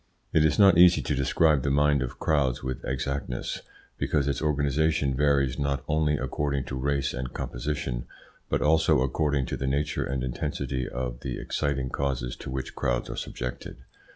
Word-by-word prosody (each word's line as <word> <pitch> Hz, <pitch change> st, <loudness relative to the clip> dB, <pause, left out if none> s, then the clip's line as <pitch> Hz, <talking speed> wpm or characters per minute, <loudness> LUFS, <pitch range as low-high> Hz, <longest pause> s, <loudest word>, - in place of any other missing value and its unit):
It 80 Hz, -, +5 dB
is 75 Hz, -2 st, +3 dB
not 95 Hz, -4 st, +6 dB
easy 90 Hz, 0 st, +7 dB
to -, -, -1 dB
describe 75 Hz, +2 st, +3 dB
the 70 Hz, -, 0 dB
mind 75 Hz, 0 st, +3 dB
of 65 Hz, -, -4 dB
crowds 70 Hz, -6 st, +1 dB
with 65 Hz, -1 st, -4 dB
exactness, 65 Hz, -1 st, -3 dB, 0.4 s
because 70 Hz, -2 st, +1 dB
its 70 Hz, -, -1 dB
organisation 75 Hz, -1 st, +1 dB
varies 70 Hz, -1 st, +2 dB
not 70 Hz, -2 st, -1 dB
only 75 Hz, -1 st, +2 dB
according 70 Hz, +1 st, -1 dB
to 65 Hz, -, -5 dB
race 70 Hz, +1 st, 0 dB
and 65 Hz, 0 st, -4 dB
composition, -, -, -3 dB, 0.4 s
but -, -, +1 dB
also 80 Hz, -3 st, +4 dB
according 70 Hz, +1 st, +1 dB
to -, -, -4 dB
the 65 Hz, -, -2 dB
nature 70 Hz, +1 st, 0 dB
and 65 Hz, -1 st, -2 dB
intensity 65 Hz, +1 st, -3 dB
of 60 Hz, -1 st, -4 dB
the 65 Hz, -2 st, -4 dB
exciting 70 Hz, -3 st, -2 dB
causes 60 Hz, -3 st, -2 dB
to -, -, -8 dB
which 65 Hz, 0 st, -4 dB
crowds -, -, -1 dB
are -, -, -5 dB
subjected. 60 Hz, 0 st, -5 dB
70 Hz, 170 wpm, -27 LUFS, 65-75 Hz, 0.4 s, easy